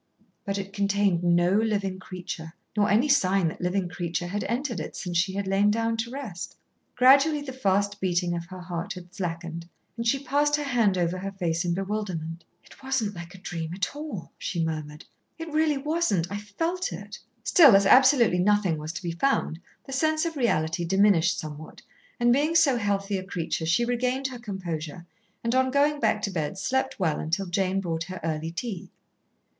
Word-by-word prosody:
But 200 Hz, -1 st, -2 dB
it 195 Hz, 0 st, -5 dB
contained 200 Hz, -3 st, +1 dB
no 175 Hz, 0 st, +3 dB
living 205 Hz, -3 st, 0 dB
creature, 180 Hz, -3 st, -7 dB, 0.2 s
nor 205 Hz, -1 st, +2 dB
any 225 Hz, +8 st, +4 dB
sign 195 Hz, -, +3 dB
that -, -, -9 dB
living 180 Hz, +1 st, 0 dB
creature 175 Hz, -1 st, -3 dB
had 200 Hz, +4 st, -3 dB
entered 245 Hz, +1 st, -2 dB
it -, -, -6 dB
since 175 Hz, -2 st, -5 dB
she 185 Hz, +2 st, +2 dB
had 200 Hz, 0 st, -2 dB
lain 195 Hz, +2 st, +3 dB
down 225 Hz, +1 st, +1 dB
to 230 Hz, +1 st, -2 dB
rest. 245 Hz, -10 st, -6 dB, 0.4 s
Gradually 280 Hz, +4 st, +5 dB
the 265 Hz, -2 st, -6 dB
fast 200 Hz, -3 st, 0 dB
beating 175 Hz, -1 st, +1 dB
of 170 Hz, 0 st, -4 dB
her 185 Hz, 0 st, -9 dB
heart 180 Hz, +3 st, -4 dB
had 180 Hz, -1 st, -11 dB
slackened, 170 Hz, -2 st, -5 dB, 0.3 s
and 230 Hz, 0 st, -3 dB
she 275 Hz, +4 st, +1 dB
passed 290 Hz, +2 st, +2 dB
her 295 Hz, -, -2 dB
hand 235 Hz, -8 st, +2 dB
over 175 Hz, +1 st, 0 dB
her 195 Hz, +1 st, -4 dB
face 170 Hz, -4 st, -1 dB
in 175 Hz, -1 st, 0 dB
bewilderment. 185 Hz, -5 st, -4 dB, 0.2 s
"It -, -, -18 dB
wasn't 265 Hz, -6 st, -1 dB
like 175 Hz, 0 st, -9 dB
a -, -, -10 dB
dream 170 Hz, -2 st, -5 dB
at 190 Hz, +7 st, -2 dB
all," 290 Hz, -, -6 dB
she 170 Hz, -3 st, -1 dB
murmured; 155 Hz, -1 st, -5 dB, 0.3 s
"it 325 Hz, -1 st, -7 dB
really 305 Hz, -1 st, +2 dB
wasn't. 275 Hz, -, 0 dB
I 200 Hz, -, -2 dB
felt 330 Hz, -, -2 dB
it." -, -, -8 dB, 0.2 s
Still 290 Hz, -, +7 dB
as 195 Hz, 0 st, +5 dB
absolutely 255 Hz, -5 st, +6 dB
nothing 190 Hz, -4 st, +2 dB
was 155 Hz, +2 st, -5 dB
to 160 Hz, -, -6 dB
be 170 Hz, -, -2 dB
found, 170 Hz, -4 st, 0 dB, 0.3 s
the 270 Hz, -, -7 dB
sense 310 Hz, +4 st, +1 dB
of 330 Hz, -1 st, -3 dB
reality 175 Hz, -, +1 dB
diminished 185 Hz, -1 st, +3 dB
somewhat, 155 Hz, 0 st, -8 dB, 0.4 s
and 240 Hz, 0 st, +4 dB
being 300 Hz, +5 st, +1 dB
so 310 Hz, -6 st, +5 dB
healthy 200 Hz, -2 st, -1 dB
a 185 Hz, -, -5 dB
creature, 170 Hz, -3 st, -3 dB
she 175 Hz, +8 st, +3 dB
regained 250 Hz, +2 st, 0 dB
her 250 Hz, -2 st, -8 dB
composure, 175 Hz, -6 st, -5 dB, 0.4 s
and 230 Hz, +1 st, 0 dB
on 260 Hz, 0 st, +3 dB
going 290 Hz, +2 st, +2 dB
back 215 Hz, -3 st, +1 dB
to 200 Hz, -, -1 dB
bed 165 Hz, +1 st, -3 dB
slept 265 Hz, +5 st, -1 dB
well 160 Hz, -5 st, +1 dB
until 170 Hz, +5 st, -1 dB
Jane 190 Hz, +1 st, 0 dB
brought 165 Hz, -3 st, -2 dB
her 185 Hz, -1 st, -7 dB
early 160 Hz, 0 st, -2 dB
tea. 185 Hz, +1 st, -5 dB
195 Hz, 190 wpm, -26 LUFS, 175-245 Hz, 0.4 s, Still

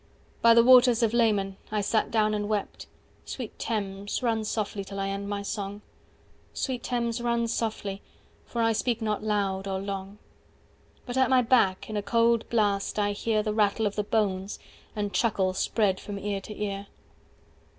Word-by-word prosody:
By 230 Hz, 0 st, +7 dB
the 235 Hz, -, +7 dB
waters 245 Hz, -1 st, +6 dB
of 225 Hz, -1 st, +2 dB
Leman 205 Hz, -5 st, +2 dB
I 210 Hz, -1 st, 0 dB
sat 215 Hz, +2 st, +1 dB
down 215 Hz, -1 st, +2 dB
and 205 Hz, 0 st, -2 dB
wept… 210 Hz, -2 st, -3 dB, 0.4 s
Sweet 245 Hz, -5 st, -7 dB
Thames, 205 Hz, 0 st, -3 dB
run 225 Hz, -2 st, +1 dB
softly 210 Hz, -2 st, -2 dB
till 195 Hz, 0 st, -7 dB
I 195 Hz, 0 st, -1 dB
end 200 Hz, +1 st, -4 dB
my 200 Hz, -1 st, -3 dB
song, 205 Hz, 0 st, -5 dB, 0.7 s
Sweet 255 Hz, -3 st, -2 dB
Thames, 235 Hz, -1 st, -2 dB
run 235 Hz, -1 st, +1 dB
softly, 215 Hz, -4 st, -3 dB, 0.4 s
for 235 Hz, -1 st, -2 dB
I 225 Hz, 0 st, +3 dB
speak 235 Hz, +1 st, 0 dB
not 215 Hz, -2 st, -1 dB
loud 200 Hz, -2 st, -1 dB
or 190 Hz, -1 st, -1 dB
long. 195 Hz, 0 st, -5 dB, 0.9 s
But 245 Hz, 0 st, -4 dB
at 260 Hz, -1 st, +4 dB
my 255 Hz, -1 st, +5 dB
back 225 Hz, -6 st, +2 dB
in 215 Hz, -, -5 dB
a -, -, 0 dB
cold 230 Hz, +2 st, +2 dB
blast 205 Hz, -4 st, +1 dB
I 205 Hz, -1 st, +1 dB
hear 215 Hz, +1 st, 0 dB
185 -, -, -15 dB
The 215 Hz, -, 0 dB
rattle 215 Hz, +1 st, +2 dB
of 205 Hz, -, -1 dB
the 210 Hz, -, 0 dB
bones, 200 Hz, -2 st, -1 dB, 0.4 s
and 205 Hz, -1 st, -2 dB
chuckle 195 Hz, -5 st, +1 dB
spread 190 Hz, 0 st, +1 dB
from 205 Hz, -1 st, -6 dB
ear 200 Hz, 0 st, -3 dB
to 210 Hz, +2 st, -9 dB
ear. 200 Hz, -1 st, -3 dB
210 Hz, 180 wpm, -27 LUFS, 200-230 Hz, 0.9 s, By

